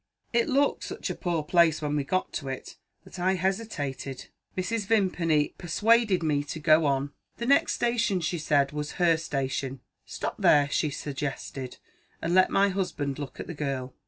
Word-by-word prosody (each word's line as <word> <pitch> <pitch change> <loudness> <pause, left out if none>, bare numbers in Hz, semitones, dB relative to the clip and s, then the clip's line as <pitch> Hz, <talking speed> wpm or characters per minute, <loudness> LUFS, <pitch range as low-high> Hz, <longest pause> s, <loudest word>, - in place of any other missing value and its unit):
It 235 0 +2
looked 280 +2 +2
such - - -4
a - - -4
poor 170 -3 -1
place, 165 0 +4
when 150 -1 -2
we 145 - 0
got 185 +7 -1
to 140 - -4
it, 130 -1 -6 0.3
that - - -11
I 185 +2 +2
hesitated. 150 - -3 0.3
Mrs. 200 +2 -1
Vimpany 175 -8 +2
persuaded 210 +2 +3
me 145 -2 +1
to 150 +2 -6
go 155 0 +4
on. 140 +1 0 0.2
The 235 - -3
next 280 +3 +4
station, 235 -5 +1
she 170 +1 -2
said, 145 -3 +2
was 150 0 -4
her 175 -3 +3
station. 135 -3 -3 0.2
'Stop - - -5
there,' 145 -1 +4
she 155 - +1
suggested, 135 -2 -5 0.4
'and 165 +1 -1
let 185 0 +5
my 200 0 +3
husband 160 -8 -2
look 145 -2 -7
at - - -4
the 175 - -6
girl. 135 -4 -3
160 Hz, 175 wpm, -27 LUFS, 145-185 Hz, 0.4 s, let